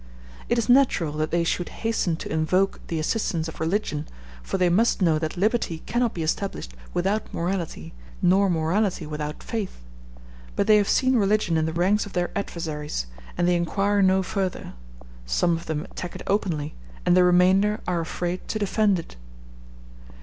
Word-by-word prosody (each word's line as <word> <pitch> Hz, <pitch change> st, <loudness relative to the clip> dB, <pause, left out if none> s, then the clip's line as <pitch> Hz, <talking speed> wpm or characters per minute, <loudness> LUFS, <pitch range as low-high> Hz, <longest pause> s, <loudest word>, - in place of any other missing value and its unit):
It 235 Hz, -, +2 dB
is 230 Hz, -, 0 dB
natural 245 Hz, -, +4 dB
that 155 Hz, 0 st, 0 dB
they 170 Hz, 0 st, +1 dB
should 175 Hz, +1 st, -1 dB
hasten 225 Hz, -7 st, -1 dB
to 160 Hz, -, -6 dB
invoke 180 Hz, +5 st, +1 dB
the 165 Hz, -, -2 dB
assistance 165 Hz, -1 st, -1 dB
of 160 Hz, -, -9 dB
religion, 160 Hz, -3 st, -1 dB, 0.3 s
for -, -, -3 dB
they 180 Hz, -1 st, +3 dB
must 210 Hz, +7 st, +3 dB
know 165 Hz, -5 st, +3 dB
that 160 Hz, +3 st, -3 dB
liberty 200 Hz, -4 st, 0 dB
cannot 240 Hz, -1 st, 0 dB
be 165 Hz, -, -2 dB
established 160 Hz, -, -2 dB, 0.2 s
without 195 Hz, +5 st, -1 dB
morality, 170 Hz, -, -3 dB, 0.3 s
nor 195 Hz, +2 st, +4 dB
morality 175 Hz, +2 st, 0 dB
without 150 Hz, 0 st, -5 dB
faith; 220 Hz, -4 st, -4 dB, 0.8 s
but -, -, +1 dB
they 215 Hz, 0 st, +6 dB
have 205 Hz, -1 st, +2 dB
seen 255 Hz, -1 st, +3 dB
religion 205 Hz, -4 st, +2 dB
in 160 Hz, 0 st, +1 dB
the -, -, -1 dB
ranks 190 Hz, +6 st, +1 dB
of 200 Hz, -, -12 dB
their 175 Hz, 0 st, -1 dB
adversaries, 155 Hz, -, -3 dB, 0.3 s
and 175 Hz, -, +2 dB
they 180 Hz, -, +3 dB
inquire 195 Hz, +4 st, +1 dB
no 190 Hz, 0 st, +4 dB
further; 190 Hz, -1 st, -3 dB, 0.5 s
some 170 Hz, -, +2 dB
of 165 Hz, -, -7 dB
them 155 Hz, -1 st, -2 dB
attack 180 Hz, -, -7 dB
it -, -, -7 dB
openly, 170 Hz, -7 st, -1 dB, 0.3 s
and 175 Hz, -, +5 dB
the 180 Hz, -, +6 dB
remainder 185 Hz, +4 st, +4 dB
are 175 Hz, -2 st, 0 dB
afraid 175 Hz, +2 st, -4 dB
to -, -, -2 dB
defend 205 Hz, -1 st, +2 dB
it. 165 Hz, -, -9 dB
180 Hz, 170 wpm, -25 LUFS, 160-205 Hz, 0.8 s, they